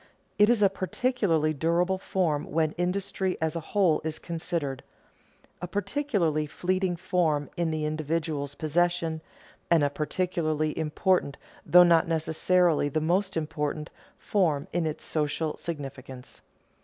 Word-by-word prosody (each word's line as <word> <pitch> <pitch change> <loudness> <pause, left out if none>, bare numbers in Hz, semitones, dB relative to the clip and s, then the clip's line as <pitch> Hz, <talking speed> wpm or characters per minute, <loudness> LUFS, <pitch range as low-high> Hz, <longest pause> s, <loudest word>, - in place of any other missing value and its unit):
It 210 +1 +6
is 235 -3 +3
a - - +8
particularly 190 -5 0
durable 170 +5 +1
form 170 -7 0
when 155 0 +1
industry 185 +1 -2
as 160 0 -1
a - - -1
whole 175 -1 +1
is 160 0 -2
considered, 165 -5 -3 0.8
a 180 - -3
particularly 200 - -1
fleeting 185 +3 -1
form 160 -4 0
in 170 -1 0
the 155 -1 -2
individual's 155 -2 -2
possession, 165 +1 0 0.5
and 165 -3 +4
a 145 - +1
particularly 155 -1 -1
important, 160 -1 0 0.3
though 180 0 +8
not 170 -2 +4
necessarily 165 0 +2
the 155 - 0
most 185 +4 0
important, 150 -1 -3 0.3
form 165 -9 0
in 170 -1 0
its 155 - -5
social 155 0 -1
significance. 135 -5 -7
165 Hz, 130 wpm, -27 LUFS, 155-180 Hz, 0.8 s, a